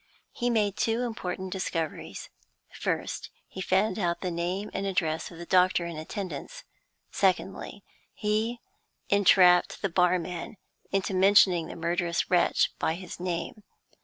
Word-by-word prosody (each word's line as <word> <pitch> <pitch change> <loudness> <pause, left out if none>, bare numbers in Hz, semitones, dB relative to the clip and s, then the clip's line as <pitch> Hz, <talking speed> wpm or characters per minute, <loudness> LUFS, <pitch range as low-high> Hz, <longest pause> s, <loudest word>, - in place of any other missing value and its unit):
He 245 0 -1
made 210 -4 +1
two 230 +2 +1
important 190 -5 -4
discoveries. 165 -4 -4 0.4
First, - - -3 0.2
he 190 - -8
found 190 +4 +1
out 175 -3 -1
the 180 - -2
name 180 +5 -3
and 195 0 -2
address 160 -4 -1
of 170 - -12
the 170 - -8
doctor 180 -1 +3
in 170 -1 -5
attendance. 195 - -6 0.5
Secondly, 190 +1 -1 0.3
he 220 +3 -1 0.5
entrapped 185 -3 +5
the 195 - +1
barman 180 +1 0 0.3
into 195 0 0
mentioning 185 -3 +5
the - - -8
murderous 170 +1 -1
wretch 175 -1 +3
by 160 - 0
his 180 0 -9
name. 175 +3 -4
185 Hz, 135 wpm, -28 LUFS, 175-200 Hz, 0.5 s, entrapped